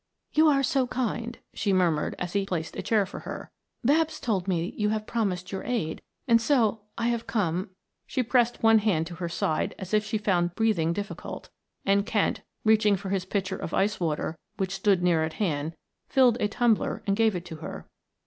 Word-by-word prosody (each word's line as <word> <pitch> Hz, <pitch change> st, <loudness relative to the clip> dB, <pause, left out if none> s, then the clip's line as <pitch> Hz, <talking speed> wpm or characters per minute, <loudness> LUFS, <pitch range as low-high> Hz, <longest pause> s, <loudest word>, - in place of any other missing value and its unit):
"You 315 Hz, +1 st, +5 dB
are 275 Hz, -2 st, +4 dB
so 270 Hz, -3 st, +2 dB
kind," 240 Hz, -1 st, -2 dB, 0.2 s
she 200 Hz, 0 st, 0 dB
murmured 175 Hz, -5 st, +2 dB
as 175 Hz, -1 st, -4 dB
he 200 Hz, -1 st, +2 dB
placed 165 Hz, -4 st, -3 dB
a -, -, -3 dB
chair 215 Hz, -3 st, +2 dB
for 190 Hz, -, -8 dB
her. -, -, -7 dB, 0.3 s
"Babs 310 Hz, +4 st, +2 dB
told 200 Hz, -6 st, -1 dB
me 180 Hz, +3 st, -1 dB
you 210 Hz, -1 st, +1 dB
have 215 Hz, 0 st, -1 dB
promised 190 Hz, -6 st, -2 dB
your 190 Hz, -, -3 dB
aid, 200 Hz, -11 st, -2 dB, 0.3 s
and 230 Hz, -1 st, +5 dB
so 225 Hz, -5 st, +2 dB, 0.2 s
I 230 Hz, +1 st, +1 dB
have 235 Hz, -1 st, -2 dB
come 185 Hz, -3 st, 0 dB, 0.2 s
" -, -, -53 dB
she 255 Hz, -, 0 dB
pressed 240 Hz, 0 st, +2 dB
one 225 Hz, 0 st, +7 dB
hand 195 Hz, -7 st, +1 dB
to 175 Hz, -, -8 dB
her 170 Hz, -1 st, -3 dB
side 160 Hz, -2 st, -1 dB
as 190 Hz, 0 st, -7 dB
if 210 Hz, 0 st, +4 dB
she 215 Hz, +1 st, -1 dB
found 175 Hz, -4 st, +1 dB
breathing 210 Hz, -8 st, +2 dB
difficult 205 Hz, +3 st, -6 dB, 0.3 s
and 200 Hz, 0 st, +3 dB
Kent, 210 Hz, -1 st, 0 dB, 0.2 s
reaching 215 Hz, -2 st, +4 dB
for 195 Hz, 0 st, -6 dB
his 190 Hz, -1 st, -1 dB
pitcher 190 Hz, 0 st, -2 dB
of -, -, -4 dB
ice 205 Hz, +2 st, +1 dB
water 160 Hz, -1 st, -2 dB, 0.2 s
which 190 Hz, -1 st, -1 dB
stood 195 Hz, -2 st, +2 dB
near 170 Hz, -3 st, +3 dB
at 160 Hz, 0 st, -2 dB
hand, 160 Hz, -4 st, -1 dB, 0.3 s
filled 250 Hz, -3 st, +5 dB
a 210 Hz, -, +3 dB
tumbler 230 Hz, 0 st, +1 dB
and 195 Hz, -, +2 dB
gave 220 Hz, -2 st, +3 dB
it 175 Hz, 0 st, -4 dB
to 160 Hz, -3 st, -7 dB
her. -, -, -8 dB
200 Hz, 205 wpm, -27 LUFS, 180-225 Hz, 0.3 s, one